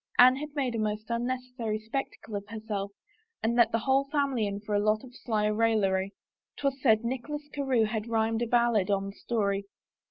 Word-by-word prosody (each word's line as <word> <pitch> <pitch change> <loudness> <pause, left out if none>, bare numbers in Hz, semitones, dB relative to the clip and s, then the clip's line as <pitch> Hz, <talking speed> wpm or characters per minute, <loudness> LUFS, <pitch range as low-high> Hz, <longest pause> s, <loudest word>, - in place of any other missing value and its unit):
Anne 255 +1 +8
had 300 +2 -5
made 265 -4 0
a 230 - -2
most 215 +1 -2
unnecessary 245 -2 -2
spec 225 +6 -3
tacle 220 - -10
of 200 0 -4
herself 215 -2 -4 0.5
and 230 +1 +1
let 235 -1 +5
the - - +2
whole 265 +4 +2
family 275 -7 +1
in 200 0 -3
for 210 0 -5
a 205 - +3
lot 215 +1 +2
of 250 -2 -13
sly 215 -2 -1
raillery. 210 -3 +2 0.5
'Twas 275 -2 -1
said 220 -4 +4
Nicholas 280 +5 -4
Carewe 265 -5 +2
had 215 0 -3
rhymed 225 0 +1
a 240 - 0
ballad 235 -4 +3
on 195 0 0
the - - -20
story. 200 -4 -1
225 Hz, 195 wpm, -29 LUFS, 210-250 Hz, 0.5 s, Anne